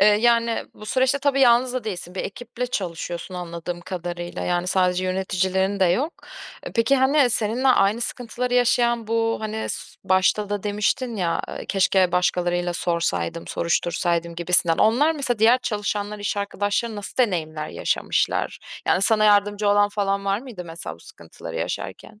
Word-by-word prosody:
eee, 200 - +7
yani, 230 +2 +3
bu 215 - -11
süreçte 260 +4 +2
tabii 280 -1 +1
yalnız 245 0 +5
da 255 -3 -3
değilsin, 180 -4 -6
bir 190 - -2
ekiple 245 +3 -5
çalışıyorsun, 175 -4 -4
anladığım 175 0 -5
kadarıyla. 175 -1 -5
Yani, 175 0 0
sadece 185 0 +1
yöneticilerin 190 +1 0
de - - +6
yok. 255 - +1 0.5
Eee, - - -5
peki, 240 +4 +3
hani, 265 0 +4
seninle 230 +5 +1
aynı 215 -2 +3
sıkıntıları 245 +1 -3
yaşayan, 240 -1 +2
bu, 225 0 +1
hani, 220 0 -3 0.4
başta 190 +2 +2
da 205 -1 -2
demiştin 210 +4 -1
ya, 170 -4 0
eee, - - -7
"Keşke 190 -2 +2
başkalarına 175 0 +1
da 175 - -1
sorsaydım, 170 - -2
soruştursaydım." 170 0 -1
gibisinden. 170 -1 +2
Onlar 255 +9 +4
mesela, 270 -7 -2
diğer 230 +4 +5
çalışanlar, 210 -2 -3
iş 205 0 -2
arkadaşların 205 +2 -1
nasıl 205 -1 -8
deneyimler 160 -10 0
yaşamışlar? - - -1 0.3
Yani, 185 - +2
sana 215 +1 +3
yardımcı 205 0 +3
olan 205 0 +4
falan 200 -1 -1
var 195 0 +1
mıydı, 235 -9 -8
mesela, 165 0 -7
bu - - -22
sıkıntıları - - -10
yaşarken? 215 - -5
205 Hz, 155 wpm, -23 LUFS, 180-235 Hz, 0.5 s, eee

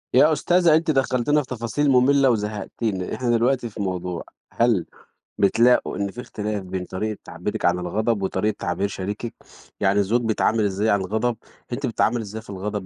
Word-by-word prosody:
يا 150 +4 +6
أستاذة 175 +2 +4
أنتِ 160 0 +2
دخّلتينا 135 +2 +2
في 130 - -11
تفاصيل 125 +4 -1
مملة 135 +1 +5
وزهّقتينا، 105 -2 -2
إحنا 125 -2 -2
دلوقتي 120 +1 +2
في 105 - -11
موضوع، 90 -2 -3 0.3
هل - - +2 0.5
بتلاقوا 115 +4 +3
إن 100 0 -2
في 125 - -7
اختلاف 105 -4 -4
بين 90 0 -4
طريقة 105 +3 -3
تعبيرِك - - -4
عن 90 +1 +3
الغضب 105 +4 -1
وطريقة 100 +3 0
تعبير 100 - -1
شريكِك، 105 +4 -5 0.5
يعني 100 0 +3
الزوج 115 +5 +2
بيتعامل 110 -1 +1
إزاي 100 +2 0
عن 100 -1 +3
الغضب، 110 +5 -1 0.4
أنتِ 130 - -2
بتتعاملي 120 0 +1
إزاي 110 +1 -7
في - - -18
الغضب، 100 0 -4
110 Hz, 170 wpm, -23 LUFS, 100-125 Hz, 0.5 s, يا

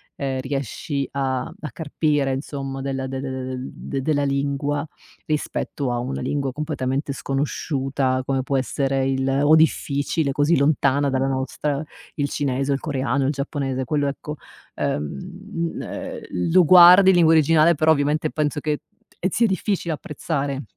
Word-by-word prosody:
ehm, 135 -1 -2
riesci 140 +1 -3
a 135 -2 0
a 150 +2 -8
carpire, 145 -2 0
insomma, 135 0 -5
della 135 -1 -3
de 135 0 -4
de 135 - -4
de 130 0 -4 0.2
de - - -6
de 135 - -5
della 145 +1 +1
lingua 140 +1 -1 0.4
rispetto 145 -3 -2
a 120 - -1
una 70 - -3
lingua 140 - -1
completamente 140 -1 -2
sconosciuta, 135 -1 -1
come 135 -1 0
può 135 +1 0
essere 135 0 0
il 135 0 0 0.2
o 150 +2 +6
difficile, 145 -1 +1
così 145 +4 +2
lontana 140 0 +2
dalla 135 0 0
nostra, 135 +2 -2 0.3
il 145 -1 -1
cinese, 135 -1 -1
o - - +4
il - - -4
coreano, 135 -2 -1
il 135 - +2
giapponese, 140 -2 -3
quello 145 +2 0
ecco, 140 +2 -5 0.4
ehm, 75 - -1 0.5
mhmm, 165 -2 -3
ehm, - - -6 0.3
lo 180 0 +6
guardi 180 +3 +9
in 190 - +6
lingua 165 -2 +5
originale, 160 +1 +5
però 155 +2 +3
ovviamente 150 +1 +1
penso 150 -1 -1
che 150 +1 -2 0.5
ehm, 185 - 0
zia 230 +5 +2
difficile 190 -3 -1
apprezzare 145 -2 -3
140 Hz, 160 wpm, -22 LUFS, 135-150 Hz, 0.5 s, guardi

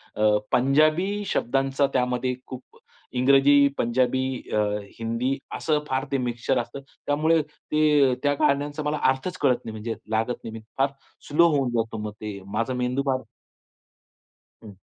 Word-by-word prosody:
अ, 105 0 +3
पंजाबी 155 +10 +2
शब्दांचा 135 +2 +1
त्यामध्ये 125 0 0
खूप 130 -1 -10 0.4
इंग्रजी, 140 +2 +5
पंजाबी, 125 +2 +1 0.3
अ, - - +3 0.4
हिंदी 115 +4 -1 0.2
असं 150 -2 +1
फार 130 +1 -1
ते 135 - +2
मिक्सचर 125 0 -1
असतं. 140 +3 -9 0.3
त्यामुळे 155 +2 +3
ते 150 -2 +2
त्या 145 0 +3
गाण्यांचा 145 +2 +1
मला 150 +1 -1
अर्थच 155 +7 -4
कळत 130 -4 +4
नाही 110 - -5
म्हणजे 110 +1 -4 0.2
लागत 110 +3 -1
नाही. 115 - -6
मी 115 - -6 0.2
फार 135 - +3 0.4
स्लो 170 +4 +5
होऊन 135 -3 +1
जातो 115 0 -2
मग 105 - -4
ते 105 -2 -5
माझा 115 +4 0
मेंदू 125 +2 0
फार. 130 -1 +1 1.4
हं. 105 -2 -10
130 Hz, 145 wpm, -25 LUFS, 120-145 Hz, 1.4 s, इंग्रजी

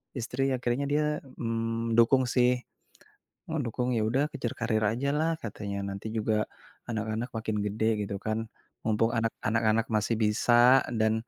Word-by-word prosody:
istri 135 +3 -1
akhirnya 125 +3 -1
dia, 150 +1 +2 0.3
mmm, 115 0 -2
dukung 130 +3 +5
sih. 125 0 +3 1.0
Oh 160 - -1
dukung, 125 +2 -2
ya - - +1
udah 135 +5 +2
kejar 120 - -3
karir 115 -2 +1
aja 135 +5 -1
lah 160 +1 +2
katanya 100 -2 -5
nanti 100 +2 -6
juga, 110 -1 +1 0.4
anak-anak 110 +2 -2
makin 110 -1 -2
gede 105 +2 -1 0.2
gitu 100 - -4
kan. 110 0 0 0.5
Mumpung 115 +1 +2
anak 115 0 0
anak-anak 110 0 +2
masih 110 +2 +1
bisa 120 +4 +5 0.2
dan, 110 0 +3
115 Hz, 150 wpm, -28 LUFS, 110-125 Hz, 1.0 s, dukung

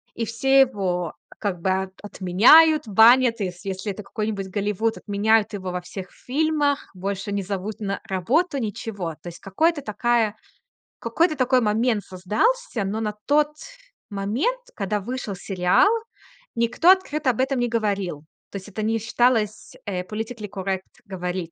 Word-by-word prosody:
И 230 - -2
все 270 +5 +3
его 190 -9 0 0.2
как 190 -5 -3
бы, 190 - 0
а, 190 0 0
отменяют, 230 - +5
банят, 230 +3 +6
если 190 0 -4
если 195 +2 -3
это 210 - -9
какой-нибудь 205 -2 -4
Голливуд, 210 +3 -1
отменяют 210 +1 +1
его 185 -2 -4
во 180 0 -3
всех 185 +1 -8
фильмах, 290 +1 -1
больше 195 +2 -4
не 200 -1 -1
зовут 200 +3 -4
на 200 -1 -3
работу, 275 - 0
ничего. 205 -6 -4
То - - -11
есть, 170 - -12
какой-то 300 - 0
такая, 225 -1 0 0.6
какой-то 310 +7 +1
такой 255 0 +3
момент 220 0 +1
создался, 220 - -1
но 200 +3 -2
на 210 -1 -2
тот 295 +1 +2 0.5
момент, 220 - -1 0.2
когда 205 0 -1
вышел 220 -1 -5
сериал, 180 - +2 0.7
никто 240 +8 +2
открыто 310 -7 +3
об 240 - 0
этом 265 0 +1
не 245 -1 0
говорил. 200 -9 -2 0.2
То 200 - -6
есть 190 - -10
это 215 +2 -5
не 225 +1 0
считалось, 225 -1 0
э, 185 -3 -3
politically 220 +2 -6
correct 190 -1 -3 0.2
говори 180 -3 -4
210 Hz, 150 wpm, -23 LUFS, 195-250 Hz, 0.7 s, банят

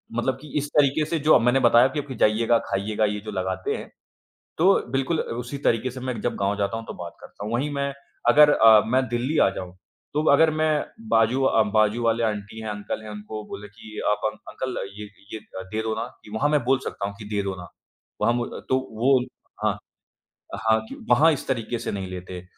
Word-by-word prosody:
मतलब 130 +2 0
कि 150 - -11
इस 145 - -1
तरीक़े 145 +1 +4
से 165 +1 -1
जो 150 +2 +6
मैंने 125 +3 +3
बताया 120 0 +6
कि 135 +3 -3
अब 145 - -4
कि 130 - -6
जाइएगा, 115 +2 +3
खाइएगा 105 +2 0
ये 105 0 -1
जो 105 - -5
लगाते 95 -1 -2
हैं। - - -8 0.7
तो 185 +5 +5 0.2
बिल्कुल 135 +5 0
उसी 120 +4 -4
तरीक़े 115 +2 +2
से 130 - -8
मैं 125 -3 -4
जब 120 - -1
गाँव 100 +1 0
जाता 105 +2 -1
हूँ 115 - -7
तो - - -7
बात 85 -1 -8
करता 100 - -9
हूँ, 110 - -4
वहीं 135 +5 0
मैं 140 0 -2 0.4
अगर 150 0 +7
अ, 110 -3 +7
मैं 130 +3 +1
दिल्ली 125 +6 -1
आ - - +5
जाऊँ, 90 -2 -7 0.4
तो 150 +1 +1
अगर 160 +2 +5
मैं 155 0 +1 0.4
बाजू 115 +4 +3
अ, 115 -4 +4
बाजू 110 +2 +3
वाले 115 0 +2
आंटी 105 0 -3
हैं, 110 - -5
अंकल 105 +1 -5
हैं 110 - -8
उनको 105 +1 -7
बोले 105 - -7
कि 105 +1 -11
आप 105 - -1
अंक 110 - -18
अंकल 130 -1 -4 0.2
ये 105 - -5 0.3
ये 110 - -4 0.2
अ, - - -5
दे 110 - -1
दो 110 0 -1
ना, 110 - -3 0.2
कि 105 - -14
वहाँ 130 +7 +1
मैं 150 -3 +2
बोल 130 0 +3
सकता 100 - -3
हूँ 100 - -7
कि 105 - -8
दे 100 - +1
दो 95 -1 -3
ना। 90 - -9 0.5
वहाँ 120 - +3
मू 120 0 -1
अ, - - -8
तो 130 - +3 0.2
वो 130 +1 +5 0.5
हाँ, - - +1 0.9
हाँ 110 0 +5
कि - - -8
वहाँ 155 +7 +6
इस 145 - -4
तरीक़े 120 -2 -1
से - - -4
नहीं 95 -2 -4
लेते 90 0 -7
अ, - - -17
115 Hz, 230 wpm, -24 LUFS, 105-135 Hz, 0.9 s, अगर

